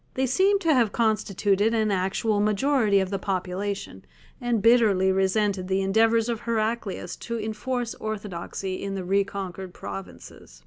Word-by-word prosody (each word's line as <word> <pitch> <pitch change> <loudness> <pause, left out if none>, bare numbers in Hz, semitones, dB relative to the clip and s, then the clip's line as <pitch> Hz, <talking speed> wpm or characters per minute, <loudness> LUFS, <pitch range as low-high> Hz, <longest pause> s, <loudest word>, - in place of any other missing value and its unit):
They 265 - +1
seem 380 +10 +3
to 330 -4 +3
have 235 -6 +3
constituted 210 -1 +1
an 215 -2 +1
actual 195 +3 0
majority 215 0 +2
of 190 0 -2
the 195 - -1
population, 195 +1 -3 0.4
and 240 -2 +1
bitterly 205 -4 +4
resented 190 0 +1
the 190 0 +1
endeavours 225 +3 +3
of 235 -2 -2
Heraclius 220 -5 -2
to 235 -1 -4
enforce 230 +3 -3
orthodoxy 195 -3 -5
in 195 0 -4
the 190 - -4
reconquered 195 -1 -2
provinces. 95 -10 -9
205 Hz, 140 wpm, -25 LUFS, 190-230 Hz, 0.4 s, bitterly